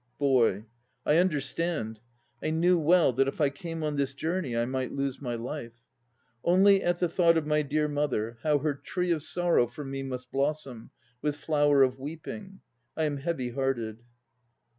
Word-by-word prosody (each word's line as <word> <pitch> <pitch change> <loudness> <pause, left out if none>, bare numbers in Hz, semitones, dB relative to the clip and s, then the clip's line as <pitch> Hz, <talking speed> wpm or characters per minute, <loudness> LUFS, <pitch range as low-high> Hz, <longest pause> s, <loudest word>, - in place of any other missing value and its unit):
BOY. 120 -7 +2 0.4
I 150 - +4
understand. 150 - 0 0.4
I - - -1
knew 170 +3 +3
well 165 -3 +4
that 135 +3 +2
if 135 - -4
I 145 -3 +3
came 165 +2 -6
on 150 -1 -1
this 135 -1 -1
journey 160 -5 -2
I 115 - +2
might 130 0 -2
lose 140 -1 -3
my 120 -3 -3
life. 120 0 -6 0.7
Only 195 +3 +5
at 175 0 0
the 180 - +2
thought 170 0 +3
Of 160 - 0
my 150 0 +2
dear 150 +1 0
mother, 130 -6 -1
How 150 -2 +3
her 145 +1 0
tree 180 +5 -2
of 160 -3 +1
sorrow 170 -5 +2
For 140 +5 -8
me 135 0 -4
must 125 -1 -6
blossom 135 -4 -2 0.3
With 150 -1 0
flower 145 -2 +3
of 130 0 0
weeping, 165 +7 -8 0.4
I 160 - +1
am 150 -2 0
heavy 135 -4 -2
hearted. 120 -4 -2
145 Hz, 175 wpm, -28 LUFS, 130-165 Hz, 0.7 s, Only